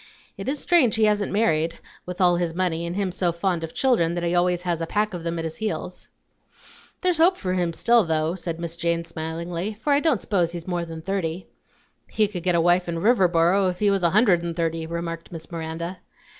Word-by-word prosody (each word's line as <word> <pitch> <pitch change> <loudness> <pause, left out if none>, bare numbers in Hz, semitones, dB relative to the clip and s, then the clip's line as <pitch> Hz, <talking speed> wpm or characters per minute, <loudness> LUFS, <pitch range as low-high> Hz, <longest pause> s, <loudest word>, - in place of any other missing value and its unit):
It - - -5
is 290 - -1
strange 290 -6 +3
he 220 - +1
hasn't 210 -1 +2
married, 165 -6 +1 0.3
with 180 0 -6
all 175 -2 +4
his 170 -2 -2
money, 170 -2 -1
and 170 - -4
him 195 -2 -1
so 180 -1 0
fond 170 0 -1
of 165 - -5
children 175 -11 +2
that 175 - -2
he 170 0 0
always 180 0 +1
has 170 -2 -1
a 165 - -2
pack 210 +2 0
of 175 -2 -5
them 170 0 -2
at 165 - -3
his 160 0 -5
heels." 220 -1 -4 0.9
"There's 360 -3 +1
hope 360 +3 +5
for 185 -1 -2
him 175 -2 0
still, 235 +7 +3
though," 160 -1 0
said 170 -2 -5
Miss 170 -1 -4
Jane 170 0 -1
smilingly; 170 +4 -4
"for 285 +7 0
I 280 - +4
don't 295 -7 +2
s'pose 175 -5 0
he's 170 -1 -6
more 175 -2 -2
than 165 -1 -8
thirty." 185 -2 -2 0.6
"He 215 -1 +2
could 190 -4 -6
get 180 0 +1
a - - +3
wife 175 +1 +2
in 170 - -2
Riverboro 185 -2 +3
if 180 - -4
he 205 +1 +2
was 195 -1 +1
a 170 - +3
hundred 200 -3 +4
and 170 -1 -4
thirty," 165 -1 -2
remarked 170 0 -5
Miss 165 +1 -9
Miranda. 170 +2 -5
175 Hz, 225 wpm, -24 LUFS, 165-200 Hz, 0.9 s, hope